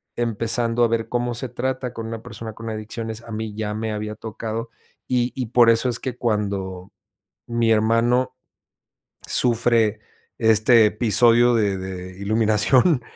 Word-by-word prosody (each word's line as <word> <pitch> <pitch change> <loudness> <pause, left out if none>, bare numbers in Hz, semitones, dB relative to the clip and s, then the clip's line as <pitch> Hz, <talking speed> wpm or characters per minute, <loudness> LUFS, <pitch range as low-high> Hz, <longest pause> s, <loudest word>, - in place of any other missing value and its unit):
empezando 115 +1 0
a - - +5
ver 115 0 -2
cómo 120 0 -1
se 120 +2 -5
trata 130 0 -3
con 115 0 -6
una 115 -1 -6
persona 110 -1 -8
con 115 0 -8
adicciones. 110 +1 -6
A 115 - -11
mí 110 -1 -4
ya 105 -1 -3
me 110 0 -3
había 105 0 -4
tocado, 115 +1 -5 0.4
y 125 -1 0
y 125 -3 -3
por 120 0 +5
eso 115 +2 +3
es 120 - -1
que 125 -2 -5
cuando 100 -4 -2 0.6
mi 120 -1 0
hermano 115 +4 +2 0.9
sufre 115 -3 +2 0.4
este 110 0 +5
episodio 120 +2 +4
de 100 -4 +1
de 95 0 -7
iluminación 110 - +3
115 Hz, 145 wpm, -22 LUFS, 110-120 Hz, 0.9 s, a